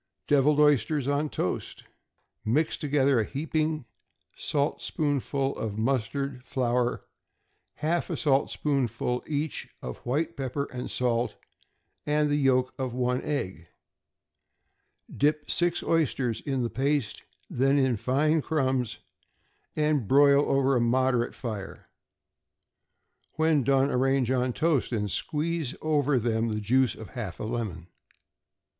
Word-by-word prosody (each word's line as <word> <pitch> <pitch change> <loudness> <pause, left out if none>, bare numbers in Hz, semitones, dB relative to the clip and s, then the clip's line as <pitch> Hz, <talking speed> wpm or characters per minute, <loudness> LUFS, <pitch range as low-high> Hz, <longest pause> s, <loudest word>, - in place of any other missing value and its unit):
=Deviled 145 +1 +3
Oysters 145 -1 +3
on 145 +2 0
Toast.= 90 - -3 0.6
Mix 145 +9 +1
together 140 -4 +2
a - - +2
heaping 155 +2 -2 0.5
saltspoonful 140 -1 -1
of 105 -2 -4
mustard 130 +2 -1
flour, 125 -1 -1 0.7
half 170 +3 -1
a - - -2
saltspoonful 135 -4 0
each 150 0 -3
of 65 - -6
white 155 +7 -1
pepper 135 +1 -2
and 125 0 -5
salt, 120 -1 0 0.7
and 150 0 +1
the - - +3
yolk 130 -2 +2
of 130 -2 -3
one 125 0 0
egg. 95 - -3 1.5
Dip 150 +1 +1
six 175 0 +1
oysters 135 -8 0
in 135 -3 -1
the 120 - -1
paste, 140 -3 -1 0.3
then 135 +3 +2
in 130 -3 +3
fine 150 +8 +1
crumbs, 130 -7 0 0.8
and 150 -7 +1
broil 140 +2 +6
over 135 0 +3
a 120 - +2
moderate 125 0 +1
fire. 105 -5 -6 1.4
When 160 -2 +2
done, 135 +1 +3
arrange 130 -1 +2
on 125 -1 +1
toast, 155 -4 +1
and 105 -4 -1
squeeze 155 - -2
over 145 -3 +1
them 115 -1 0
the 105 -1 -2
juice 125 +4 +2
of 110 - -10
half 105 -8 -6
a - - -4
lemon. 110 -7 -4
135 Hz, 120 wpm, -27 LUFS, 120-150 Hz, 1.5 s, broil